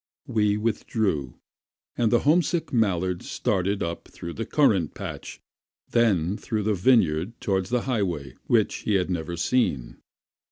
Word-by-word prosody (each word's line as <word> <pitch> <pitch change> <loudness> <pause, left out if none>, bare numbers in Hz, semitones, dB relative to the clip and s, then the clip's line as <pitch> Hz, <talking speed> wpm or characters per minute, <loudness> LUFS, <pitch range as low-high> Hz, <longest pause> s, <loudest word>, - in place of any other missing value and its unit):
We 105 -2 +1
withdrew, 105 - -1 0.6
and 115 -2 +1
the 120 - +4
homesick 165 +1 +1
mallard 95 -6 +1
started 95 +2 -1
up 85 0 -5
through 85 - -8
the 115 - -5
currant 105 - +2
patch, - - -7 0.5
then 100 -5 +2
through 110 -3 -3
the 105 +1 +1
vineyard 95 -2 +2
toward 95 -2 0
the 125 +2 0
highway 90 - -2
which - - +2
he 105 - -1
had 95 -1 +1
never 85 0 -3
seen. 85 - 0
100 Hz, 135 wpm, -25 LUFS, 85-115 Hz, 0.6 s, the